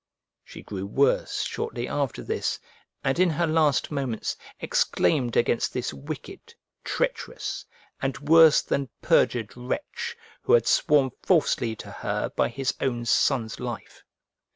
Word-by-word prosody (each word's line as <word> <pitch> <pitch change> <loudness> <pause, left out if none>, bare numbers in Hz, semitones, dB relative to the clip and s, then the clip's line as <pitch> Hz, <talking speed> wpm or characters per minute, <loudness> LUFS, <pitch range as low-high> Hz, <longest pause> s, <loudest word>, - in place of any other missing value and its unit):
She - - -12
grew 100 -1 -5
worse 135 +7 +1
shortly 120 0 -3
after 140 -4 -2
this; - - -2 0.4
and - - 0
in 185 -1 +5
her 170 +2 +1
last 155 -3 +2
moments 135 -6 -2 0.2
exclaimed 130 -7 +1
against 120 0 +1
this 125 0 -2
wicked, 385 - -9 0.3
treacherous, - - -3 0.3
and 135 0 -1
worse 155 +2 +6
than 140 -2 -1
perjured 115 -4 +2
wretch, 125 - -4 0.2
who - - +1
had 480 - +5
sworn 145 -6 +3
falsely 135 -10 +2
to - - -10
her - - -2
by - - +2
his 130 +2 -2
own 120 -3 -1
son's 115 -1 +1
life. 120 -5 -7
135 Hz, 130 wpm, -26 LUFS, 120-160 Hz, 0.4 s, worse